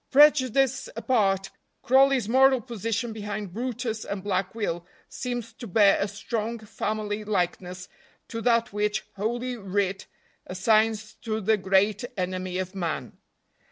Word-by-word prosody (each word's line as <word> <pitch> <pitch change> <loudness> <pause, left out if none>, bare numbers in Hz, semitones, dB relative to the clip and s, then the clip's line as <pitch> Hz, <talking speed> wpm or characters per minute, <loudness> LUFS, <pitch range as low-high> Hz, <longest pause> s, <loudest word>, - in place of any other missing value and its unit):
Prejudice 270 -2 +4
apart, 195 -6 +1 0.3
Crawley's 265 -3 +4
moral 265 +2 +5
position 230 0 -3
behind 210 -3 -5
brutus 240 -1 -3
and 195 -2 -5
Black 190 0 -1
Will 175 -6 -2 0.2
seems 245 -3 -5
to 235 +2 -9
bear 200 +1 +5
a 200 - +1
strong 225 +3 -3
family 215 -1 -3
likeness 180 -2 -2 0.4
to 230 - -5
that 235 -2 +2
which 210 0 0
Holy 240 +5 -2
Writ 195 -1 -2 0.4
assigns 215 +3 +2
to 220 -2 -2
the 220 +1 +3
great 195 +2 +2
enemy 185 0 -2
of 185 0 -3
man. 170 -5 -4
215 Hz, 125 wpm, -26 LUFS, 195-235 Hz, 0.4 s, moral